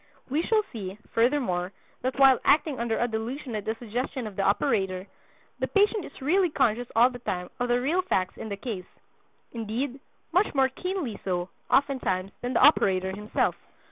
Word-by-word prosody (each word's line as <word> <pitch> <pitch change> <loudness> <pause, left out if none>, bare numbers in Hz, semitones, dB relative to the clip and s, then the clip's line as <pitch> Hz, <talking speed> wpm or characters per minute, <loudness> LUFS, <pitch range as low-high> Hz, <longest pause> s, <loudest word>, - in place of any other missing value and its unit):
We 300 +4 +2
shall 430 +4 +2
see, 195 -3 -6 0.2
furthermore, 230 -7 +1 0.3
that 255 +2 -2
while 270 -2 +7
acting 290 -2 +3
under 230 -1 0
a 240 - +1
delusion 235 +3 -4
at 210 - -4
the 220 - -1
suggestion 245 +2 -4
of 210 -2 -7
the 195 - -1
operator, 190 -1 +1 0.5
the - - 0
patient 410 -1 +2
is - - -12
really 360 +5 +3
conscious 245 -5 +1
all 240 +3 +6
the 245 - -8
time 180 -6 -4
of 245 - 0
the 240 0 +2
real 310 +9 +1
facts 190 - -1
in 220 - -7
the 200 - -4
case—indeed, 230 +4 -6 0.3
much 365 -1 +2
more 265 -1 +4
keenly 335 - -4
so, 180 -1 -2 0.2
oftentimes, 250 -9 +1
than 245 +1 -2
the - - +2
operator 190 -10 +4
himself. 210 +2 0
240 Hz, 175 wpm, -27 LUFS, 200-275 Hz, 0.5 s, while